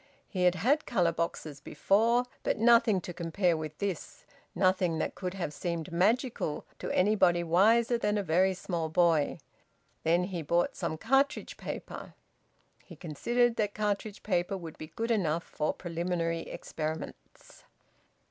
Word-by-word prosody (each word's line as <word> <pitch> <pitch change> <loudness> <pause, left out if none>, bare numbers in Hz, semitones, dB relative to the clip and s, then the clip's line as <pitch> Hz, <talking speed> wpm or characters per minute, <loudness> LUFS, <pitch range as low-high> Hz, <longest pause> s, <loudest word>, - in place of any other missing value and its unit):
He 185 -3 -1
had 180 0 +4
had 270 - +1
colour 180 -8 +2
boxes 160 -3 -4
before, 230 +9 +2 0.2
but - - 0
nothing 230 -4 +5
to 175 - -7
compare 170 +1 0
with 155 -1 -6
this, 195 -5 -5 0.3
nothing 185 -2 +2
that - - -2
could 185 0 -5
have 170 -6 -3
seemed 170 +1 -4
magical 205 - 0
to - - -4
anybody 185 -3 +3
wiser 225 +8 +3
than 210 -1 +1
a 205 - 0
very 185 +3 +2
small 170 -3 -3
boy. 165 -3 +2 0.6
Then 170 +2 +2
he 180 -2 -4
bought 170 +3 +1
some 160 - -3
cartridge 270 - +1
paper; - - -7 0.7
he - - -12
considered 235 - 0
that 205 -1 -1
cartridge 210 0 -2
paper 185 -1 0
would 165 -4 -9
be 155 - -7
good 230 +8 -3
enough 170 -7 +1
for 150 - -2
preliminary 170 -1 -3
experiments. 155 +1 -7
180 Hz, 145 wpm, -30 LUFS, 165-210 Hz, 0.7 s, nothing